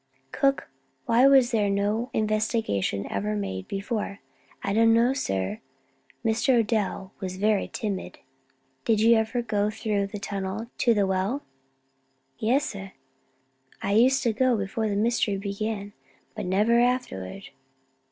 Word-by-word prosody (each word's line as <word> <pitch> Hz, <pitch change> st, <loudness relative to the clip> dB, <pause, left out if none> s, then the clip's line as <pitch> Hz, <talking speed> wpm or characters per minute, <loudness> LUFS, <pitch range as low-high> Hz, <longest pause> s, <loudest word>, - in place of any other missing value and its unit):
Cook, 275 Hz, 0 st, +1 dB, 0.4 s
why 245 Hz, +1 st, +5 dB
was 265 Hz, -3 st, +5 dB
no 205 Hz, +3 st, +1 dB
investigation 215 Hz, -, 0 dB
ever 105 Hz, +2 st, -1 dB
made 95 Hz, -2 st, -4 dB
before?" 200 Hz, 0 st, -3 dB, 0.5 s
"I 200 Hz, -, -1 dB
don't 225 Hz, +1 st, +5 dB
know, 240 Hz, +3 st, +4 dB
sir. 95 Hz, -, -2 dB, 0.7 s
Mr. 230 Hz, +3 st, +3 dB
Odell 205 Hz, -3 st, -2 dB
was 185 Hz, -1 st, -5 dB
very 210 Hz, 0 st, +1 dB
timid." 200 Hz, -4 st, -4 dB, 0.7 s
"Did 220 Hz, -2 st, +2 dB
you 230 Hz, +1 st, +6 dB
ever 225 Hz, +2 st, 0 dB
go 210 Hz, -2 st, 0 dB
through 210 Hz, -2 st, -1 dB
the 205 Hz, +1 st, -7 dB
tunnel 200 Hz, +3 st, -4 dB
to 235 Hz, -2 st, +4 dB
the 205 Hz, -1 st, +3 dB
well?" 190 Hz, +9 st, -1 dB, 1.0 s
"Yes, 260 Hz, +7 st, +2 dB
sir. 195 Hz, -2 st, -7 dB, 0.9 s
I 195 Hz, -, 0 dB
used 255 Hz, +6 st, +4 dB
to 235 Hz, -3 st, +2 dB
go 250 Hz, +1 st, +2 dB
before 210 Hz, +2 st, -2 dB
the 200 Hz, -, -1 dB
mystery 215 Hz, -1 st, +1 dB
began, 200 Hz, +1 st, -4 dB, 0.4 s
but -, -, -5 dB
never 210 Hz, +6 st, +3 dB
afterward." 240 Hz, -, -1 dB
215 Hz, 130 wpm, -26 LUFS, 195-235 Hz, 1.0 s, you